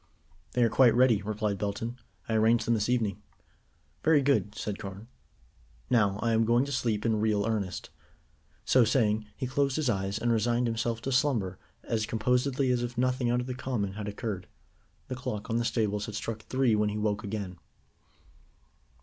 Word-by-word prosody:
"They 125 - +3
are 115 - +4
quite 120 -2 +5
ready," 120 -4 +4
replied 105 -1 -2
Belton. 115 +4 -3 0.3
"I 115 - -1
arranged 110 +1 +3
them 120 - +2
this 110 0 0
evening." 110 -6 0 0.8
"Very 155 -3 +4
good," 130 -7 +1
said 105 -1 -4
Carne. 100 +2 -8 0.8
"Now, 105 -5 +3
I 115 - +2
am 110 0 +3
going 120 +3 +3
to 140 - -6
sleep 115 -5 -1
in 110 -2 +2
real 105 -2 +1
earnest." 105 -5 -3 0.7
So 130 - +5
saying, 110 -2 +1
he 130 - -2
closed 135 +1 0
his 150 -6 +1
eyes, 95 0 -2
and 120 +1 0
resigned 120 +2 +2
himself 115 0 -1
to 135 - -2
slumber 115 -9 +1 0.2
as 110 -2 -1
composedly 125 +3 +1
as 125 -1 +1
if 120 0 -4
nothing 125 0 +1
out 120 +1 +2
of - - -5
the 130 - -4
common 125 -6 -2
had 105 0 -5
occurred. 105 -3 -4 0.6
The - - -4
clock 125 -5 -5
on 115 - +1
the 120 - +1
stables 105 -3 0
had 110 - -6
struck 110 0 -4
three 130 0 +1
when 105 0 +2
he 105 - -3
woke 105 -1 -1
again. 100 -4 -5
115 Hz, 185 wpm, -29 LUFS, 105-125 Hz, 0.8 s, quite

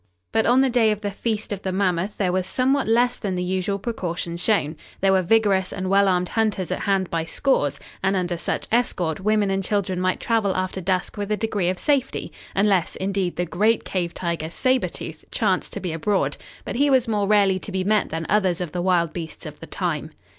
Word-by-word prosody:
But 220 0 +2
on 250 +3 +5
the 270 - +3
day 235 -3 +4
of 210 -1 -1
the 205 -1 -2
Feast 215 +1 -3
of 200 -2 -3
the 190 - -2
Mammoth 185 0 0
there 185 -3 +1
was 185 0 0
somewhat 265 +5 +1
less 240 +2 +3
than 195 -4 -3
the 180 - -1
usual 190 +2 -1
precaution 180 -6 -4
shown. 170 -4 +1 0.2
There 195 0 +3
were 190 -1 +4
vigorous 195 -1 +2
and 185 -1 -3
well 200 0 +5
armed 180 -1 +1
hunters 210 -5 0
at 185 - -1
hand 195 -2 0
by 165 -1 0
scores, 145 - 0 0.2
and 195 +1 +1
under 180 -2 0
such 170 - -2
escort 185 -9 +1
women 210 0 +2
and 195 0 0
children 190 -2 -1
might 185 0 +1
travel 220 -4 +1
after 185 0 -2
dusk 185 +3 -1
with 205 0 -3
a 210 - +2
degree 205 -4 0
of 185 - -1
safety, 275 0 0 0.2
unless, 195 -3 +2
indeed, 190 -2 -1
the 175 - -1
great 210 +7 +2
cave 175 -3 -2
tiger, 170 -3 -2
Sabre 255 +8 +1
Tooth, - - -8
chanced - - 0
to - - -3
be 180 -4 -3
abroad, 195 +5 0 0.3
but - - -4
he 285 +2 +3
was 260 -3 +3
more 210 -3 0
rarely 200 -2 +4
to 200 - -8
be 190 -1 -1
met 210 +1 +2
than 160 +1 -3
others 190 -4 +2
of 175 -4 -4
the 175 - -2
wild 175 -3 +2
beasts 165 -2 -7
of - - -8
the - - -9
time. - - -2
195 Hz, 220 wpm, -23 LUFS, 180-215 Hz, 0.3 s, on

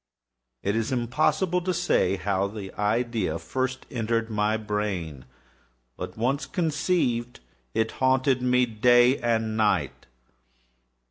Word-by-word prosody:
It 100 +2 0
is 115 +1 -1
impossible 155 +9 +1
to 180 0 -1
say 170 - +2
how 95 +1 0
first 100 - -11
the 100 -3 -7
idea 110 -5 0 0.5
entered 115 -1 -1
my 105 +1 +1
brain; 100 - -3 0.7
but - - -7
once 130 +6 0
conceived, 150 - 0 0.4
it 110 0 +1
haunted 130 0 +2
me 125 0 +3
day 120 +3 +4
and 115 -2 0
night. 110 -1 0
115 Hz, 115 wpm, -26 LUFS, 105-130 Hz, 0.7 s, day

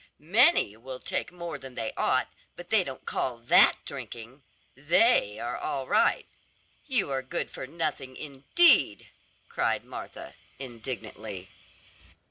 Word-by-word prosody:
"Many 200 - +4
will 130 +2 -8
take 185 +6 -3
more 170 -4 -6
than 130 -1 -11
they 115 -1 -3
ought, - - +1 0.3
but 175 - -12
they 220 -4 +5
don't 135 -5 -8
call 125 -2 -2
that 115 0 +6
drinking! 120 +4 -8 0.3
They 150 - +3
are 120 +2 -4
all 135 -1 -3
right, - - +3 0.6
you 240 - 0
are 135 -1 -1
good 130 - -4
for 130 - -7
nothing 145 -4 -4
indeed!" 145 - +3 0.4
cried - - -1
Martha - - -9 0.2
indignantly. 110 -6 -7
135 Hz, 125 wpm, -28 LUFS, 120-170 Hz, 0.6 s, that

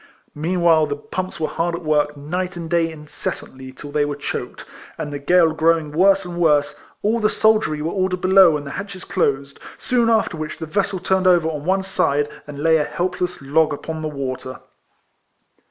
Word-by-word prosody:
Meanwhile, 165 0 +2
the 145 - -2
pumps 185 +5 -5
were 155 - 0
kept 170 +1 -1
at 170 - -7
work 150 -1 +1
night 180 +6 -3
and 170 -1 -5
day 165 -1 +1
in 150 -1 -11
cessantly 130 -3 -6
till 145 +2 -10
they 145 0 +1
were 145 0 -2
choked; 145 - -5 0.3
and 145 - -5
the 145 - -4
gale 165 +2 +4
growing 160 -1 +2
worse 195 +4 +3
and 175 -1 -6
worse, 150 -4 +3 0.3
all 225 +3 +2
the 215 -1 +2
soldiery 215 -10 +2
were 165 - -1
ordered 185 -2 -1
below, 185 -3 +6
and 145 - -8
the 140 - -6
hatches 200 -2 -7
closed; 140 -5 -1 0.2
soon 240 -2 +1
after 220 -7 +1
w^hich 155 0 -5
the - - -5
vessel 195 +4 -1
turned 190 +1 +1
over 175 -3 +4
on 150 -2 -5
one 190 +1 +1
side, 160 -7 +1 0.2
and 145 -1 -8
lay 160 +2 +3
a 150 - +1
helpless 180 0 -3
log 150 +3 +2
upon 160 +2 -5
the 155 - -2
water. 130 -3 -5
160 Hz, 195 wpm, -21 LUFS, 150-185 Hz, 0.3 s, below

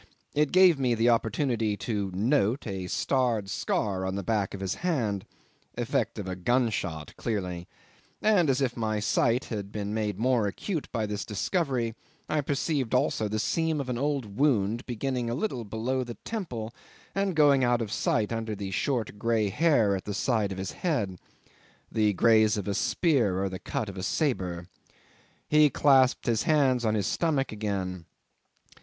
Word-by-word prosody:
It 150 -1 +2
gave 180 -5 +6
me 125 -3 +2
the 115 +2 +3
opportunity 115 -2 +1
to 100 -1 -2
"note" 120 +3 +1
a 95 -4 -4
starred 115 -2 0
scar 100 -4 -1
on 95 0 -2
the 100 - -3
back 100 -1 -1
of - - -8
his 95 -1 -2
hand 120 - -1 0.5
effect - - -1
of 100 - -5
a 95 - -3
gunshot 90 - -1
clearly; 90 -6 -3 0.5
and, 200 -8 +3
as 135 +1 +2
if 125 -3 0
my 110 -2 -1
sight 115 +3 +2
had 100 -2 -4
been 105 0 -4
made 105 -3 -1
more 120 -1 +2
acute 155 - -4
by 115 -3 -1
this 105 0 -3
discovery, 120 - -1 0.3
I 155 - +1
perceived 140 -2 -1
also 110 - +1
the 110 +1 -2
seam 160 +7 0
of 135 -2 -4
an 125 - -1
old 135 -8 -2
wound, 120 -5 +2
beginning 125 0 -2
a 120 - -1
little 135 - -2
below 115 +5 -2
the 120 -1 -8
temple 125 - -4 0.4
and 195 -2 0
going 145 -3 +5
out 120 -1 +3
of 110 -3 -3
sight 110 0 0
under 110 -1 -3
the 100 -1 -5
short 110 0 -1
grey 115 -2 +1
hair 115 - +3
at 95 - -5
the 105 - -3
side 110 -3 0
of 95 - -5
his 95 0 -4
head 105 - -2 0.7
the 105 -2 +2
graze 110 +1 +4
of 100 - -4
a 100 - 0
spear 115 - +1
or 100 - 0
the 95 0 -6
cut 110 - -3
of 100 -1 -8
a - - -4
sabre. 90 - -1 0.8
He 150 -1 +5
clasped 130 -1 +4
his 115 -2 +1
hands 130 -4 +2
on 110 0 +2
his 105 - 0
stomach 150 -5 0
again. 95 -5 -3
115 Hz, 175 wpm, -28 LUFS, 100-135 Hz, 0.8 s, gave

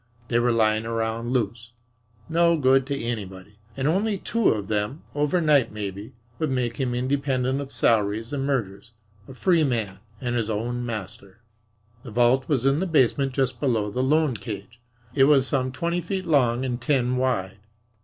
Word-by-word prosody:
They 120 - +2
were 120 0 +2
lying 110 -1 +2
around 115 0 -2
loose, 115 -1 -2 0.5
no 170 0 +3
good 135 -2 +3
to 140 -1 -2
anybody, 105 -3 -6 0.2
and 135 +1 0
only 200 +6 +1
two 230 +3 +1
of 105 -3 -1
them, 105 +8 -2
overnight 150 -2 +2
maybe, 105 +2 -6 0.3
would 155 - 0
make 125 -3 -1
him 125 -3 -1
independent 130 0 0
of 140 -1 -8
salaries 110 +2 +1
and 140 -2 -1
mergers 115 -5 -3 0.3
a 130 - -11
free 170 +3 +3
man 110 -9 -2 0.2
and 120 -2 -2
his 115 -2 -1
own 120 +3 -2
master. 105 -2 -7 0.6
The - - -10
vault 120 +3 +2
was 135 -4 +1
in 135 +2 +3
the 190 - -1
basement 135 -3 +2
just 130 -1 0
below 115 -7 0
the 125 - -1
loan 150 0 +2
cage. 115 +2 -8 0.3
It 135 0 +5
was 140 -2 +5
some 130 -1 +1
twenty 170 +6 -2
feet 185 +2 -4
long 130 -6 +2
and 125 -1 -3
ten 125 -2 +1
wide. 115 -6 -1
125 Hz, 170 wpm, -24 LUFS, 115-140 Hz, 0.6 s, It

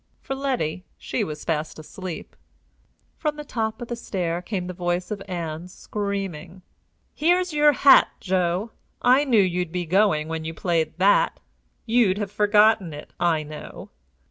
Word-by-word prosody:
For - - -5
Letty, 255 - -2
she - - -2
was 150 -1 -6
fast 155 -1 -2
asleep. 170 +2 -8 0.8
From 300 -2 -1
the 300 - -7
top 225 -3 -3
of - - -8
the 240 - -3
stair 175 -7 -3
came 185 -1 -4
the 180 - -5
voice 175 +1 -2
of 205 -2 -4
Ann, 170 -2 -4
screaming: 190 -3 -5 0.5
"Here's 355 +2 +2
your 295 0 +5
hat, 280 +1 +7
Joe. 185 +3 0 0.3
I 260 +4 +5
knew 230 -7 +4
you'd 180 -2 -1
be 180 0 -2
going 175 -3 +2
when 160 0 -4
you 160 0 -5
played 165 -3 -1
that. 195 +3 +3 0.5
You'd 225 -5 +3
have 205 -2 -3
forgotten 210 -4 +3
it, 150 - -11
I 165 -3 +2
know!" 150 0 -10
185 Hz, 155 wpm, -24 LUFS, 170-220 Hz, 0.8 s, hat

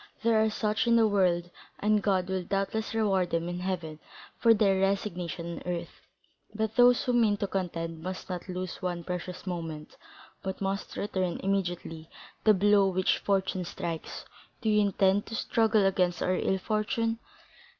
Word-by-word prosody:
There 225 -1 +4
are 220 - +3
such 215 +2 -1
in 235 - +5
the 225 -1 +5
world, 180 -4 +1 0.3
and 210 0 +2
God 190 -3 +1
will 190 -1 -1
doubtless 195 +5 -2
reward 195 -5 +2
them 165 0 -1
in 175 0 -4
heaven 175 -4 -4 0.4
for 230 - +5
their 200 -3 +4
resignation 180 -3 -2
on 180 - -2
earth, 170 -1 -6 0.5
but 220 0 -2
those 245 0 +6
who 250 - 0
mean 220 -4 +3
to 200 - -1
contend 165 -4 -3
must 185 +2 -6
not 180 0 -6
lose 185 0 -5
one 175 -2 -3
precious 180 +1 -5
moment, 165 -4 -5 0.4
but 190 -1 -4
must 195 0 -3
return 185 -3 -2
immediately 175 -4 -2 0.4
the 215 -1 +7
blow 200 +1 +4
which 185 0 +1
fortune 190 -2 0
strikes. 165 -1 -5 0.4
Do 220 - 0
you 210 0 +4
intend 200 0 +2
to 225 - -5
struggle 220 -2 +2
against 180 -2 +1
our 185 - +1
ill 190 - +1
fortune? 225 +3 -1
190 Hz, 165 wpm, -29 LUFS, 180-210 Hz, 0.5 s, the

